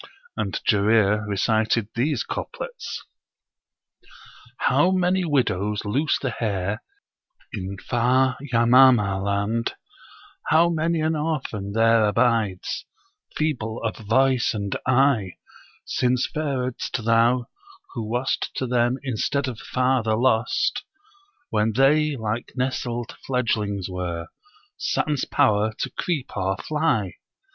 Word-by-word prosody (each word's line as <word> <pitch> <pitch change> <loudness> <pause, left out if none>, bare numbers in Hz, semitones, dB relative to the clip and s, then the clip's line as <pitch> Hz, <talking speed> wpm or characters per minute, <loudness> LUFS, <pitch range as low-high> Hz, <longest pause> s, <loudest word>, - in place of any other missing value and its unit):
And - - -2
Jarir 105 0 +3
recited 110 +1 +1
these 140 +6 0
couplets: - - -6 1.5
'How 180 - +3
many 185 0 +1
widows 105 - 0
loose 135 +9 +1
the - - -3
hair, 100 -2 -2 0.7
in 95 -1 -5
far 125 +5 +1 0.2
Yamamah 115 -5 +5
land, 100 +3 -1 0.7
How 165 +2 +4
many 165 0 0
an 160 +1 +1
orphan 135 -10 -3
there 115 0 +4
abides, 105 -3 0 0.5
feeble 120 -8 -2
of 110 -1 -1
voice 125 +3 +2
and 100 -2 -3
eye, 130 -7 +3 0.5
Since 125 -1 +1
faredst 130 -6 -2
thou, 115 +2 +3 0.5
who 120 - -4
wast 125 +3 -1
to 130 - -1
them 120 0 +1
instead 140 +2 -1
of 120 -4 -5
father 125 -4 +1
lost 115 0 +1 0.7
when 105 +1 +1
they 145 +4 +3
like 110 -1 -4
nestled 125 -2 -3
fledglings 105 -7 -1
were, 90 -2 -4 0.5
sans 150 -4 -1
power 105 +1 +2
to - - -3
creep 155 -8 -3
or 95 0 -1
fly. 150 - -1
120 Hz, 105 wpm, -24 LUFS, 105-135 Hz, 1.5 s, Yamamah